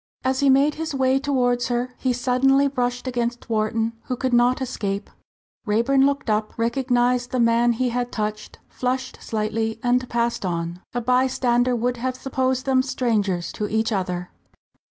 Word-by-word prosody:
As 260 0 0
he 280 - +4
made 275 +3 +4
his 315 -2 -4
way 265 0 +2
towards 250 -4 +1
her, 245 +1 -2
he 260 - +1
suddenly 265 +3 +3
brushed 245 -2 -2
against 240 -1 -3
Wharton, 225 +1 0
who 255 - -2
could 255 0 -2
not 245 +1 +4
escape. 205 -6 -3 0.6
Raeburn 265 +6 +3
looked 280 -2 -2
up, 215 0 -1
recognised 245 +1 +1
the 255 - -1
man 235 0 +3
he 250 +2 0
had 245 0 -2
touched, 215 0 -4
flushed 255 0 -3
slightly 220 +1 -2
and 250 +1 +1
passed 235 -1 -1
on. 170 -1 -3
A 245 - 0
bystander 250 0 +2
would 245 +1 -1
have 255 +2 -2
supposed 260 0 -1
them 265 -1 +3
strangers 210 -9 -1
to 210 - -3
each 220 +1 0
other. 180 -3 -2
245 Hz, 160 wpm, -23 LUFS, 225-260 Hz, 0.6 s, he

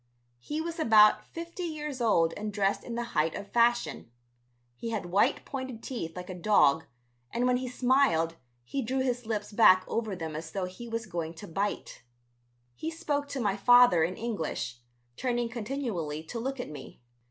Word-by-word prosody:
He 300 - -3
was 335 0 -5
about 215 -7 +6
fifty 335 +2 -7
years 300 -6 -4
old 165 -8 +3
and 210 0 -4
dressed 200 -1 0
in 235 - -6
the 240 - -1
height 155 0 +1
of 200 0 -7
fashion. 240 - +2 0.7
He 230 - -5
had 220 -5 -2
white 205 +9 +2
pointed 260 -4 -6
teeth 165 -11 -5
like 180 0 -7
a - - -4
dog 170 -5 +3 0.4
and 240 - -1
when 250 0 +3
he 255 0 -4
smiled 245 -10 +2 0.3
he 270 - -3
drew 260 +2 -1
his 245 -3 -1
lips 215 -2 -2
back 185 -4 +6
over 220 -4 -2
them 160 -3 -5
as 160 +1 -5
though 195 -2 -1
he 185 +6 -9
was 230 -1 -3
going 170 -4 -4
to 160 - -9
bite. 200 +5 -3 0.7
He 315 - -4
spoke 295 -4 -2
to 285 -1 -4
my 205 -5 +1
father 245 -5 +6
in 180 +3 -1
English, 160 - -3 0.4
turning 240 -2 -1
continually 215 - -3
to 230 +8 -6
look 265 +3 -3
at 245 - -5
me. 140 -3 -10
225 Hz, 180 wpm, -29 LUFS, 180-255 Hz, 0.7 s, about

